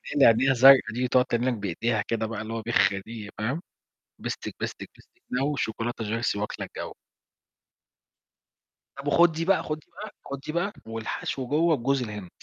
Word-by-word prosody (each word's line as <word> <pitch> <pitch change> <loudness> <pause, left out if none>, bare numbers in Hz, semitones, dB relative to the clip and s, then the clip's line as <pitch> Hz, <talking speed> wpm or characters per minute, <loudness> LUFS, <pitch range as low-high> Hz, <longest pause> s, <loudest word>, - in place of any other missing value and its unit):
اللي 145 - +6
عينيها 125 +4 +5
زرقا 130 -3 +7
دي، 125 +1 0
تقعد 125 0 +4
تعمل 120 +2 0
لك 130 - +2
بإيديها 105 +2 -1
كده، 115 -1 -1
بقى 110 -1 -4
اللي 110 +1 -5
هو 115 - -3
بِخ 105 -4 +3 0.2
دي، 110 -3 -8
فاهم، 125 +10 -2 0.6
بستك - - -5
بستك - - -5
بستك 360 -1 -24
نووو 140 +3 0
شوكولاتة 115 0 -2
جيرسي 110 -1 -1
واكلة 105 - -4
الجو. - - -7 2.1
طب 140 +1 -7
وخد 170 +3 +5
دي 165 +1 -3
بقى 195 0 +3
خد 155 0 -3
دي - - -25
بقى - - -8
خد 140 0 -5
دي 155 - -6
بقى، 185 +5 -1
والحشو 115 +3 -4
جوا 160 +3 +3
بجوز 135 +1 0
الهند. 105 -6 -6
120 Hz, 180 wpm, -26 LUFS, 110-140 Hz, 2.1 s, زرقا